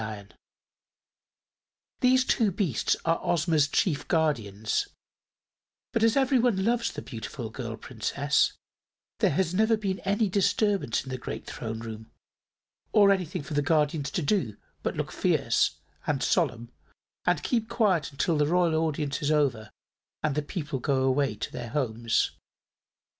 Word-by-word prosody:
These 255 0 +4
two 220 -5 +2
beasts 175 - 0
are 165 0 +2
Ozma's 160 -3 +2
chief 145 0 0
guardians, 110 - 0 1.1
but 230 - +1
as 225 +3 +4
everyone 245 -7 +3
loves 235 0 +1
the - - -7
beautiful 115 0 -6
girl 115 -2 -5
Princess 140 +5 0 0.7
there - - +4
has 170 +3 0
never 220 +3 +3
been 195 -3 -2
any 205 +3 +1
disturbance 200 - +1
in 130 - -8
the 130 - -4
great - - -6
Throne 110 -1 -5
Room, 110 -1 -8 0.8
or 200 -2 +6
anything 180 -6 -1
for 150 - -7
the 145 - +2
guardians 150 -1 +1
to 175 - -2
do 140 - 0 0.2
but - - -2
look - - -3
fierce - - +1 0.3
and - - 0
solemn 115 0 0 0.5
and 170 -4 +1
keep 230 -3 0
quiet 210 -10 +1
until 150 +3 0
the 150 - +3
Royal 175 0 +2
Audience 150 -2 -2
is 145 - 0
over 140 -8 +1 0.5
and 155 -2 +1
the 150 - 0
people 150 -3 -4
go 135 0 +1
away 130 -3 +1
to 105 - -5
their 120 -2 -6
homes. 115 -4 0
150 Hz, 140 wpm, -27 LUFS, 130-195 Hz, 1.1 s, or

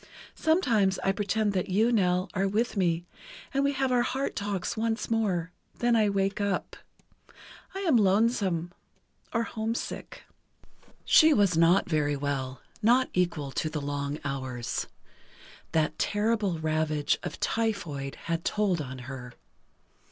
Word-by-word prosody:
Sometimes 230 - +2
I 195 - +3
pretend 205 +1 0
that 185 -1 -1
you, 215 +6 +3
Nell, 185 -4 +2
are 195 +1 +1
with 220 +5 0
me, 175 -3 +1 0.5
and 275 +1 +2
we 280 0 +2
have 270 -1 0
our 245 -1 +4
heart 265 +3 -2
talks 200 -3 -2
once 225 +1 -2
more; 185 -6 0 0.3
then 240 0 +2
I 215 -2 +3
wake 195 0 0
up.... 200 -1 -1 1.0
I 390 - -3
am 325 -10 +4
lonesome, 195 -4 +2 0.6
or 230 -1 +1
homesick. 225 0 -4 0.8
She 315 -1 +6
was 200 -5 +3
not 170 +3 +4
very 150 -4 +1
well, 135 -2 -3 0.2
not 245 +4 +4
equal 170 -6 0
to 155 - -1
the 155 - -3
long 145 0 -3
hours. 130 -3 -3 0.8
That 155 -1 0
terrible 205 -4 +1
ravage 155 -1 0
of - - -6
typhoid 170 -12 -2
had 165 0 -2
told 200 -6 +1
on 130 -2 -6
her. 125 -2 -8
195 Hz, 135 wpm, -28 LUFS, 155-225 Hz, 1.0 s, She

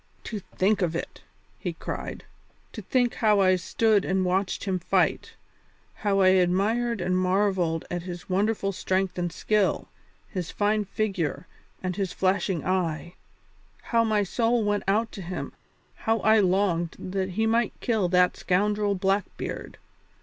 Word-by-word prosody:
"To 215 - -5
think 195 +2 0
of 170 -2 0
it!" - - -5 0.4
he - - -3
cried, - - -6 0.5
"to - - -6
think 245 -2 +1
how 215 -3 +3
I 185 -1 +5
stood 210 +3 +2
and 190 -1 0
watched 185 +1 0
him 190 -2 -1
fight; 170 - 0 0.6
how 200 -2 +1
I 185 - +6
admired 200 +5 +2
and 180 +1 0
marvelled 185 -3 +1
at 175 -1 -2
his 175 0 -8
wonderful 195 +1 0
strength 190 -1 -1
and 175 -1 -1
skill, 210 +3 0 0.4
his 180 -5 -4
fine 210 0 +1
figure, 190 -6 -2 0.4
and 185 0 -2
his 195 -3 -2
flashing 190 -2 0
eye! 175 -2 -1 0.7
How 230 -1 +2
my 215 -2 +2
soul 230 +3 +1
went 205 0 0
out 220 +3 +1
to 195 - -8
him, 180 +1 -5 0.4
how 225 0 +1
I 220 0 +5
longed 180 -3 +1
that 190 0 -3
he 220 - +2
might 230 0 +1
kill 215 -7 0
that 180 0 +4
scoundrel 205 +2 +1
Blackbeard! 195 +1 -2
195 Hz, 150 wpm, -26 LUFS, 180-210 Hz, 0.7 s, I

